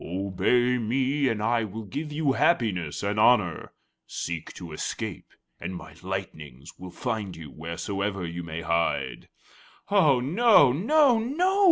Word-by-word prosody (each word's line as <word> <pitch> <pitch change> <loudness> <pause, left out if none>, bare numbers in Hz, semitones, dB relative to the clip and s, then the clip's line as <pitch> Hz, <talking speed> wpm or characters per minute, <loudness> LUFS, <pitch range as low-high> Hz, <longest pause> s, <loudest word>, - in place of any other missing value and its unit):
Obey 100 +7 +1
me, 130 +5 0
and 110 -4 -1
I 115 +1 +2
will 110 +1 -6
give 145 +10 -5
you 150 -1 +1
happiness 105 - +1
and 100 +1 -1
honor; 105 -7 +3 0.4
seek 85 -1 -5
to 85 -3 -9
escape, 75 - -5 0.3
and 95 - -5
my 90 -2 -10
lightnings 80 -8 -6
will 90 0 -8
find 110 -3 -4
you 80 -3 -10
wheresoever 95 +4 -4
you 85 +1 -5
may 85 -1 -6
hide." 85 -6 -1 0.6
"Oh, 155 -11 +5
no! 160 - +5
no! 250 - +4
no!" 350 - 0
105 Hz, 140 wpm, -26 LUFS, 85-135 Hz, 0.6 s, Oh